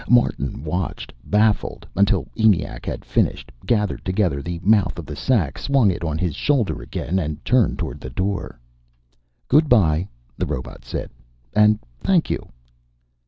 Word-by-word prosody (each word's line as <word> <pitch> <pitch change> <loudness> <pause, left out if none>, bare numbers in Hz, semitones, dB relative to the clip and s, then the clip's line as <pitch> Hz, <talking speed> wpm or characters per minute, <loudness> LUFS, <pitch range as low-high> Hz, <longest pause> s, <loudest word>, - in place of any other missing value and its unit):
Martin 80 - +2
watched, 90 +3 -3
baffled, 105 0 +1
until 100 +1 +2
ENIAC 110 -6 +1
had - - -4
finished, - - 0 0.2
gathered 105 -4 +1
together 90 -7 0
the 85 +3 -4
mouth 105 -1 +3
of - - -6
the 75 - -7
sack, 85 - 0
swung 135 -8 +3
it 85 - -5
on 80 -2 -1
his 85 -1 -1
shoulder 135 -8 0
again, 95 +5 -2
and 75 -3 -4
turned 125 -2 +3
toward - - -4
the 65 - -6
door. 95 -2 -3 0.9
"Good 150 +2 +4
bye," 90 -6 +4 0.3
the - - 0
robot 65 - -5
said. - - -5 0.4
"And 105 0 +5 0.2
thank 180 -4 +2
you." - - -3
100 Hz, 150 wpm, -22 LUFS, 80-110 Hz, 0.9 s, And